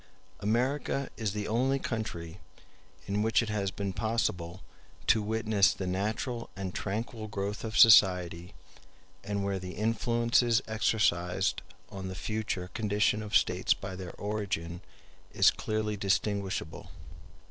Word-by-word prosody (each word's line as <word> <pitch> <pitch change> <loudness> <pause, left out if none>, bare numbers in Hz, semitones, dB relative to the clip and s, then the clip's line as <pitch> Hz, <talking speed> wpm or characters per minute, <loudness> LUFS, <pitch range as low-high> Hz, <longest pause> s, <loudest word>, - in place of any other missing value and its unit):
America 130 +6 0
is 105 -1 -2
the 105 -1 -3
only 130 +5 +1
country 100 -9 -4 0.7
in 100 +1 -1
which 110 +2 +3
it 110 - -5
has 100 -2 -1
been 100 0 -4
possible 95 -5 -2 0.4
to 110 - +4
witness 110 -1 +2
the 95 - -4
natural 110 +6 -2
and 95 -2 -5
tranquil 110 +2 -4
growth 100 0 -4
of 110 0 -3
society, 90 -5 +6 0.7
and 100 -1 -2
where 100 -1 -1
the 90 0 -7
influences 115 +1 +2
exercised 95 -4 +1 0.3
on 95 -1 -6
the 95 - -5
future 100 -4 -3
condition 105 0 +1
of 105 0 +3
states 90 +1 +1
by 95 -1 -7
their 90 -1 -7
origin 100 -5 -3 0.5
is - - +6
clearly 110 -1 -2
distinguishable. 100 0 -1
105 Hz, 125 wpm, -30 LUFS, 95-110 Hz, 0.7 s, society